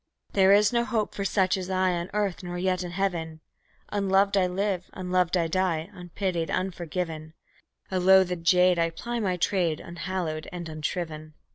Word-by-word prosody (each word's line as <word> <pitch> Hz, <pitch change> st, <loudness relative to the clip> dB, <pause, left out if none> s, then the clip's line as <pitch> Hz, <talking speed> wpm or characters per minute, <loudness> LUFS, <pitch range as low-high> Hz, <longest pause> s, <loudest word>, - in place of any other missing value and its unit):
There 195 Hz, -1 st, +5 dB
is 205 Hz, +2 st, +5 dB
no 235 Hz, 0 st, +3 dB
hope 225 Hz, -4 st, -1 dB
for 200 Hz, -, -3 dB
such 190 Hz, -1 st, +2 dB
as 185 Hz, 0 st, -5 dB
I 185 Hz, 0 st, +2 dB
on 170 Hz, +1 st, -3 dB
earth, 205 Hz, -3 st, -1 dB
nor 175 Hz, -1 st, -5 dB
yet 185 Hz, 0 st, 0 dB
in 175 Hz, -, -5 dB
Heaven; 175 Hz, -4 st, -2 dB, 0.5 s
Unloved 200 Hz, 0 st, +2 dB
I 190 Hz, -2 st, +3 dB
live, 185 Hz, 0 st, -2 dB
unloved 180 Hz, -1 st, 0 dB
I 170 Hz, -, +1 dB
die, 170 Hz, -2 st, -1 dB
unpitied, 175 Hz, -1 st, -3 dB
unforgiven; 170 Hz, -3 st, -3 dB, 0.6 s
A 185 Hz, -, +1 dB
loathed 180 Hz, -2 st, +4 dB
jade, 180 Hz, +1 st, +4 dB
I 165 Hz, 0 st, +2 dB
ply 235 Hz, +8 st, -4 dB
my 185 Hz, -5 st, 0 dB
trade, 175 Hz, -3 st, +1 dB
unhallowed 170 Hz, -2 st, -4 dB
and 175 Hz, -2 st, -6 dB
unshriven. 155 Hz, 0 st, -5 dB
180 Hz, 165 wpm, -27 LUFS, 170-190 Hz, 0.6 s, There